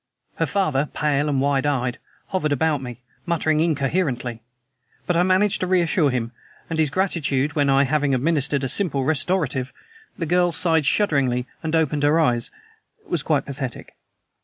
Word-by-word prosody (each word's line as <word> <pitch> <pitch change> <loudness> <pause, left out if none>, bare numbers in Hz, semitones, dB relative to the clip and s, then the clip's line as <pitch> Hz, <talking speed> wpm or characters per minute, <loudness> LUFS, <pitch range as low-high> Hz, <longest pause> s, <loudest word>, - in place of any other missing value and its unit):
Her - - 0
father, 150 -8 0
pale 150 0 +1
and 140 -2 +1
wide 140 +1 +1
eyed, 125 -4 -1 0.3
hovered 165 -6 -1
about 145 0 +1
me, 125 -1 -8 0.2
muttering 155 -2 +1
incoherently; 135 -6 -1 0.6
but 180 - 0
I 170 - +4
managed 185 +2 +2
to 185 - -1
reassure 175 -4 +2
him; 120 -3 -2 0.4
and 160 - -1
his 155 -2 +3
gratitude 150 -5 0
when, 145 -2 +1
I 135 0 +4
having 145 0 +1
administered 140 0 0
a - - 0
simple 145 -2 0
restorative, 145 -3 0 0.5
the 165 - -2
girl 175 +2 +2
sighed 160 -5 +1
shudderingly 135 -10 +1 0.2
and 160 0 -1
opened 150 -2 +1
her 145 +3 +3
eyes, 120 -7 +1 0.6
was 170 - -1
quite 150 -1 0
pathetic. 135 -3 -6
150 Hz, 160 wpm, -22 LUFS, 135-165 Hz, 0.6 s, I